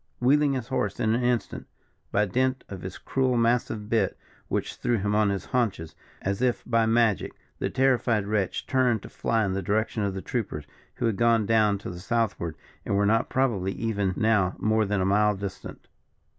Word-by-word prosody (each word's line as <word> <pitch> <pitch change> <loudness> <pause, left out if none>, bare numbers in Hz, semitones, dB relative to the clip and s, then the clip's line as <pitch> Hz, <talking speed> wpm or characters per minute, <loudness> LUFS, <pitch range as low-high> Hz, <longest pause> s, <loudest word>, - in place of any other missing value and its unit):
Wheeling 140 +3 +3
his 130 -3 -4
horse 130 - -1
in 110 -2 +2
an 120 - +1
instant, 120 -3 -1 0.4
by 105 - +2
dint 130 +6 0
of 95 -3 -7
his 95 -1 -7
cruel 130 -2 0
massive 115 -2 +1
bit, 110 -4 +1 0.3
which - - -3
threw 120 -1 0
him 105 0 -1
on 105 -1 +3
his 100 -2 -2
haunches, 105 -10 -1 0.3
as 100 +3 -1
if 125 -2 +1
by 115 -1 +2
magic, 115 -2 +2 0.3
the - - -1
terrified 120 -5 +2
wretch 100 -3 -1
turned 125 -5 +1
to - - -9
fly 115 -2 0
in 95 - -1
the 100 - -1
direction 110 +3 0
of 100 -2 -1
the 95 - -4
troopers, 95 - -3 0.3
who - - -2
had 110 -4 0
gone 115 -2 +3
down 105 -2 +3
to 95 - -7
the 90 - -8
southward, 100 -6 -1 0.3
and - - -1
were 100 +1 +3
not 110 +2 +2
probably 105 -8 0
even 100 -5 -1
now 105 -5 +2
more 110 0 +2
than 100 -1 0
a - - +1
mile 105 +2 +3
distant. 100 0 -7
110 Hz, 195 wpm, -26 LUFS, 100-120 Hz, 0.4 s, Wheeling